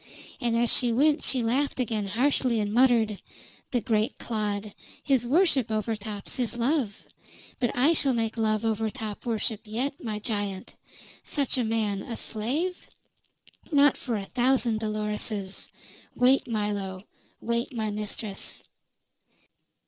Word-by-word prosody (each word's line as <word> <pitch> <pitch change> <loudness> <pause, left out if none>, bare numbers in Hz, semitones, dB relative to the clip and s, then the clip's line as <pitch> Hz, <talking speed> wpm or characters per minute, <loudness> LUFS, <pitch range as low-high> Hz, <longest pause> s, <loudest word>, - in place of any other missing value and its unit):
And 235 -2 +1
as 235 0 +3
she 245 -2 +3
went 290 +6 +3
she 255 -3 +1
laughed 265 +5 0
again 220 -4 -1
harshly 245 +2 +2
and 205 0 -1
muttered: 230 -4 +3 0.5
"The 245 - 0
great 220 -2 0
clod! 210 -2 -3 0.3
His 265 -4 +2
worship 285 - +3
overtops 215 -1 -3
his 240 -2 -1
love. 240 -4 0 0.6
But 245 -3 +2
I 280 +7 +5
shall 275 -5 +3
make 225 -1 -1
love 220 -1 +1
overtop 220 0 -2
worship 220 -1 -1
yet, 250 +6 -3
my 215 -3 -2
giant! 205 -3 -3 0.5
Such 285 -3 -1
a 255 - +1
man 220 -3 0
a 230 - -6
slave? 285 +12 -1 0.8
Not 285 -1 +5
for 240 -4 -3
a 200 -2 -3
thousand 245 -1 +2
Doloreses! 210 -2 -2 0.5
Wait, 255 +2 +4
Milo; 205 -4 -2 0.4
wait, 235 +2 -1
my 215 -1 -1
mistress!" 210 -1 -4
225 Hz, 130 wpm, -27 LUFS, 210-250 Hz, 0.8 s, I